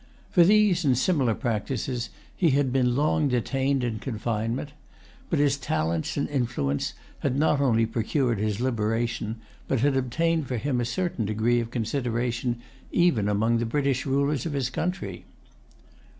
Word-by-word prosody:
For 175 - +6
these 200 -2 +4
and 130 -4 +3
similar 130 -6 +2
practices 120 +1 -2 0.3
he 175 - +3
had 135 -3 +1
been 125 -2 +2
long 150 +1 +2
detained 135 +1 0
in 115 -3 -2
confinement. 115 +2 -3 0.6
But 165 - +1
his 145 -1 +3
talents 80 - -1
and 140 - 0
influence 120 - -1 0.3
had 135 -1 -1
not 145 -1 +3
only 115 -4 +3
procured 115 +1 0
his 105 0 -1
liberation, 115 -2 -1 0.3
but 130 - 0
had 140 0 +3
obtained 155 +4 0
for 125 - -2
him 125 +1 0
a - - 0
certain 170 - -2
degree 110 +3 +1
of 115 -1 -3
consideration 120 0 -1 0.3
even 130 - +3
among 110 +3 +2
the 115 - 0
British 140 +1 0
rulers 140 +1 +1
of 155 - -4
his 130 -3 -1
country. 180 +8 -3
125 Hz, 150 wpm, -26 LUFS, 115-140 Hz, 0.6 s, For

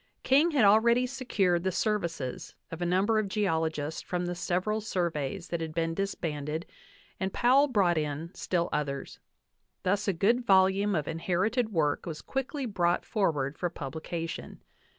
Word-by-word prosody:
King 290 +6 +4
h,ad 260 -7 +5
already 235 +4 +5
secured 215 -9 0
the 190 - +1
services 170 - -2 0.2
of 165 +1 -6
a 175 - 0
number 195 +5 +2
of 215 - -1
geologists 160 -6 -1
from 180 0 -3
the 175 - -2
several 185 +5 -1
surveys 170 -4 -2
that 170 -1 -2
had 160 -1 -5
been 165 0 0
disbanded 160 -4 -3 0.5
and 190 0 -1
Powell 260 +7 +4
brought 190 - +2
in 155 +4 -4
still 170 -2 -1
others; 140 -2 -3 0.6
thus 200 +3 0
a 195 - +2
good 225 +8 +2
volume 195 0 +4
of 150 -3 -1
inherited 190 +8 0
work 155 -5 0
was 160 -3 -6
quickly 270 +1 -3
brought 175 -6 0
forward 150 -9 0
for 175 - 0
publication. 165 +2 -6
180 Hz, 150 wpm, -29 LUFS, 165-210 Hz, 0.6 s, h,ad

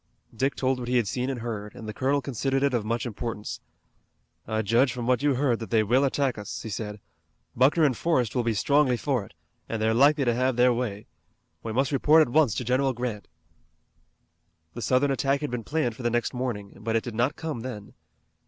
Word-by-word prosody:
Dick 135 +5 0
told 130 -1 0
what 120 - -5
he 125 0 +2
had 115 -4 +1
seen 125 +6 -2
and 130 -3 -4
heard, 105 -3 -5
and 110 - -9
the 110 - -5
colonel 140 +3 0
considered 135 +1 -1
it 140 -2 +2
of 120 -3 0
much 115 +3 -2
importance. 115 -2 -5 0.9
"I 110 0 -1
judge 120 +5 +3
from 120 -1 -5
what 125 0 +2
you 145 -2 +2
heard 125 -3 +1
that 115 - -7
they 110 -2 +3
will 125 +6 +3
attack 135 -3 0
us," 105 - -6
he 110 - -6
said. 105 0 -5 0.6
"Buckner 140 +6 +4
and 140 -5 +3
Forrest 130 -6 0
will 125 - +1
be 115 -2 0
strongly 140 +2 +3
for 130 -4 -1
it, 85 - -19 0.3
and 115 - -2
they're 110 +1 +2
likely 140 +3 +4
to 120 - +2
have 130 +1 +1
their 125 +1 +4
way. 115 -4 -3 0.6
We 115 - -5
must 130 +5 +1
report 150 +3 +5
at 120 - -5
once 150 -9 +4
to - - -2
General 130 +2 +1
Grant." 120 -4 -4 1.5
The - - -7
Southern 130 +6 +2
attack 135 +1 +1
had 150 - -3
been 120 -2 -3
planned 125 -4 -1
for 125 - -10
the 120 - +1
next 120 +2 -1
morning, 120 -6 -4
but 110 +2 -2
it 115 - +1
did 120 - -6
not 120 +6 0
come 160 -6 -4
then. 115 -4 -7
125 Hz, 220 wpm, -26 LUFS, 115-135 Hz, 1.5 s, report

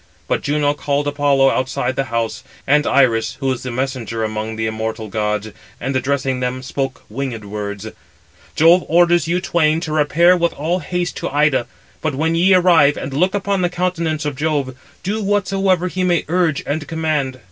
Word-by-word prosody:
But - - 0
Juno 145 0 +1
called 145 0 -1
Apollo 140 -2 +3
outside 130 0 -1
the 135 - -1
house, 115 -1 -3 0.2
and 150 +2 +3
Iris, 115 -5 +2
who 135 -2 0
is 130 - -3
the 130 - -5
messenger 125 -2 -3
among 110 0 -3
the 110 0 -2
immortal 110 0 -3
gods, 105 +1 -2 0.3
and 130 +2 -3
addressing 130 0 0
them, 130 0 -3
spoke 135 0 -4
winged 120 -2 -5
words: 100 0 -5 0.7
"Jove 170 +3 +5
orders 175 -1 +3
you 175 +2 +1
twain 160 -3 +1
to 160 - -4
repair 155 +4 +4
with 170 -1 0
all 165 +5 -1
haste 180 -1 -3
to - - -3
Ida, 145 -4 +2 0.3
but 155 -4 -1
when 160 +4 0
ye 185 +3 +4
arrive, 170 -6 +5
and 135 - -5
look 180 +7 +1
upon 200 -1 0
the 175 - +1
countenance 170 -4 -2
of 145 -2 -2
Jove, 145 -3 -1 0.3
do 210 +4 -2
whatsoever 195 -2 +1
he 185 +1 -2
may 175 -3 +1
urge 170 -3 +1
and 145 +1 -3
command." 155 -5 -1
145 Hz, 180 wpm, -19 LUFS, 130-170 Hz, 0.7 s, Jove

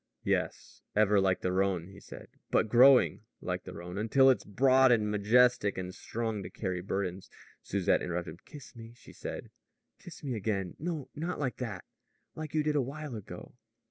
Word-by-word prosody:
"Yes, - - -2
ever 105 -1 +4
like 95 -1 +1
the 90 - 0
Rhone," 95 -2 0
he 100 0 -13
said; - - -12 0.2
"but 110 - +2
growing, 125 - +6 0.2
like - - -4
the - - -8
Rhone, 90 +3 -6
until 130 +5 +5
it's 130 - -1
broad 130 +4 +4
and 105 -3 +2
majestic 105 0 +3
and 90 0 -5
strong 110 -1 -4
to - - -7
carry 90 -4 -3
burdens 95 -1 -3 0.2
" - - -27
Susette - - +1
interrupted 85 0 -3
him. - - -16
"Kiss 145 -4 -13
me," 115 0 -11
she - - -16
said. - - -7 0.5
"Kiss 170 -2 -12
me 135 -3 -2
again. 100 -4 -2
No 160 -4 -4
not 165 +4 -4
like 135 -4 -2
that; 110 -8 -5 0.5
like 155 -1 -7
you 155 - +2
did 150 0 0
a 145 - +3
while 140 +1 -6
ago." 105 - -9
110 Hz, 185 wpm, -30 LUFS, 95-130 Hz, 0.5 s, growing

